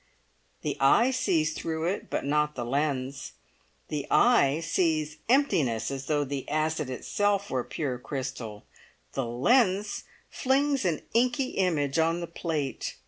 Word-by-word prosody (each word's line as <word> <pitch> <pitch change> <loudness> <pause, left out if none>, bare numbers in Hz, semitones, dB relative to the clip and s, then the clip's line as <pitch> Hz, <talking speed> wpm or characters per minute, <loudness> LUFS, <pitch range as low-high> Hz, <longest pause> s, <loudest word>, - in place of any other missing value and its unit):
The - - -2
eye 235 - +5
sees 175 -12 +1
through 160 0 -3
it, 190 +4 -2
but - - -2
not 150 +1 +1
the 120 - -3
lens. 135 - -2 0.6
The 150 -2 -3
eye 160 - +4
sees 160 -2 0
emptiness 155 - +2
as 135 0 -5
though 145 -1 +1
the 140 -1 -5
acid 155 -1 0
itself 200 +9 -1
were 130 -2 0
pure 130 -4 -3
crystal; 125 -6 -5 0.5
the 135 -3 -2
lens 200 - +2 0.2
flings 275 -1 +1
an 165 -4 0
inky 250 +3 +2
image 160 -6 0
on 165 +1 +2
the 170 - -3
plate. 160 -5 -3
155 Hz, 140 wpm, -28 LUFS, 135-195 Hz, 0.6 s, eye